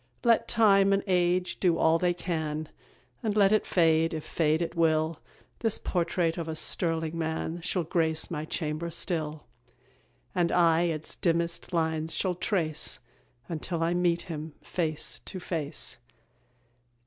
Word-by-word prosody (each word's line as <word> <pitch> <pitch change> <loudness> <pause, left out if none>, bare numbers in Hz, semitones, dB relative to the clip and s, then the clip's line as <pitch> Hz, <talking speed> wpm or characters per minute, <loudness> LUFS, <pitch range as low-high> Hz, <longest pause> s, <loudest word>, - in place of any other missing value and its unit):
Let 235 -2 +4
time 200 -3 +5
and 195 - +1
age 180 -1 +1
do 175 -3 +3
all 160 +1 +3
they 175 0 +1
can, 155 -3 -3 0.5
And 215 -2 -1
let 200 -1 +5
it 215 - +2
fade, 165 -2 +3
if 155 - -4
fade 155 -1 +1
it 170 -1 -2
will, 160 -1 +1 0.4
This 225 -2 +2
portrait 175 -1 0
of 165 - -4
a 160 - -3
sterling 165 0 +1
man 160 +1 -3
Shall 175 +1 -1
grace 160 -1 0
my 150 -2 -3
chamber 155 +1 -3
still; 155 -3 -2 0.9
And 175 -2 +1
I 170 -1 +4
its 160 -2 -3
dimmest 170 0 -1
lines 160 -1 0
shall 185 -2 +1
trace, 170 -4 -1 0.5
Until 165 0 -3
I 170 +1 +1
meet 175 -1 +1
him 155 -3 -6
face 155 -4 -3
to 190 - -6
face. 160 -5 -4
165 Hz, 145 wpm, -28 LUFS, 160-180 Hz, 0.9 s, time